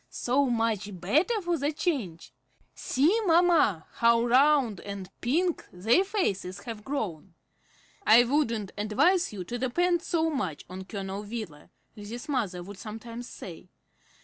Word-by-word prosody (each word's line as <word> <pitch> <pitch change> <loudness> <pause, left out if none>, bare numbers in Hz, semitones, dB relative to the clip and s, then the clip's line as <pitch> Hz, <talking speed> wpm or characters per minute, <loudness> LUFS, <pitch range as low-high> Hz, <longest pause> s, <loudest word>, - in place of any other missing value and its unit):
So 270 +3 +1
much 220 -5 -1
better 310 - +2
for 345 -2 0
the 285 +2 0
change! 195 - -3 0.4
See, 300 - +1
mamma, 330 - +4
how 235 0 +4
round 255 -4 +4
and 200 -2 -7
pink 330 +8 0
their 220 - +3
faces 200 - -2
have 225 -2 -7
grown!" 195 - -4 0.7
"I 235 - +7
wouldn't 235 -7 0
advise 340 - +2
you 200 -4 -6
to 240 +7 -5
depend 345 +8 +1
so 325 -2 0
much 185 - -3
on 185 +1 -8
Colonel 195 0 -5
Wheeler," 210 -8 -7 0.3
Lizzie's 220 +3 -8
mother 210 -11 -2
would 200 +1 -10
sometimes 230 +3 -8
say. 180 0 -10
230 Hz, 135 wpm, -28 LUFS, 195-295 Hz, 0.7 s, I